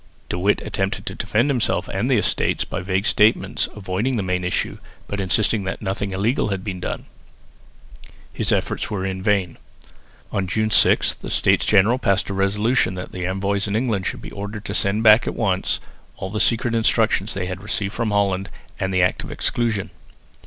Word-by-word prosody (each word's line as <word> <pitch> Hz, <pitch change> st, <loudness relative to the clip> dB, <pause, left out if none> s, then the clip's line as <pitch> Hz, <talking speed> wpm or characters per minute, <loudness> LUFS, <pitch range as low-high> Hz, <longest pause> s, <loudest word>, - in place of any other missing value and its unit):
De 90 Hz, -, -2 dB
Witt 100 Hz, +3 st, +2 dB
attempted 95 Hz, -2 st, -2 dB
to -, -, -4 dB
defend 115 Hz, +6 st, 0 dB
himself 130 Hz, -5 st, 0 dB
and -, -, -1 dB
the -, -, +4 dB
Estates, -, -, +1 dB
by -, -, -4 dB
vague 95 Hz, +2 st, -1 dB
statements, 105 Hz, +1 st, +2 dB
avoiding 105 Hz, +6 st, -1 dB
the 105 Hz, -, -1 dB
main 90 Hz, -1 st, -1 dB
issue, 90 Hz, -, -2 dB, 0.3 s
but 100 Hz, -, -4 dB
insisting 100 Hz, +2 st, +1 dB
that 95 Hz, -, -4 dB
nothing 100 Hz, 0 st, -3 dB
illegal 105 Hz, +8 st, 0 dB
had 95 Hz, -2 st, -3 dB
been 95 Hz, -3 st, -4 dB
done. -, -, -4 dB, 1.3 s
His -, -, -1 dB
efforts -, -, -1 dB
were 95 Hz, -2 st, -2 dB
in 95 Hz, -1 st, -3 dB
vain. 95 Hz, -4 st, +1 dB, 0.7 s
On 95 Hz, -1 st, -1 dB
June 110 Hz, +3 st, 0 dB
6 -, -, +5 dB
the -, -, -8 dB
States -, -, +3 dB
General 110 Hz, +5 st, +4 dB
passed 100 Hz, -4 st, +1 dB
a -, -, -2 dB
resolution 100 Hz, +1 st, +1 dB
that 90 Hz, -, -6 dB
the 90 Hz, -1 st, -3 dB
envoys 100 Hz, +2 st, -1 dB
in 100 Hz, -, -1 dB
England 110 Hz, -5 st, 0 dB
should -, -, -4 dB
be -, -, -8 dB
ordered 100 Hz, +1 st, -6 dB
to 100 Hz, -, -3 dB
send 105 Hz, +2 st, 0 dB
back 110 Hz, +2 st, +7 dB
at -, -, -2 dB
once 95 Hz, -4 st, 0 dB, 0.4 s
all 95 Hz, -, -5 dB
the 105 Hz, -, -2 dB
secret 115 Hz, +1 st, +2 dB
instructions 110 Hz, -3 st, +2 dB
they 95 Hz, -2 st, -2 dB
had 95 Hz, +1 st, -5 dB
received 100 Hz, -1 st, -2 dB
from 115 Hz, -2 st, -1 dB
Holland, 100 Hz, -2 st, 0 dB, 0.3 s
and 95 Hz, 0 st, -1 dB
the 90 Hz, -1 st, +3 dB
Act 90 Hz, -, +1 dB
of -, -, -8 dB
Exclusion. 115 Hz, -5 st, -1 dB
100 Hz, 190 wpm, -22 LUFS, 95-110 Hz, 1.3 s, back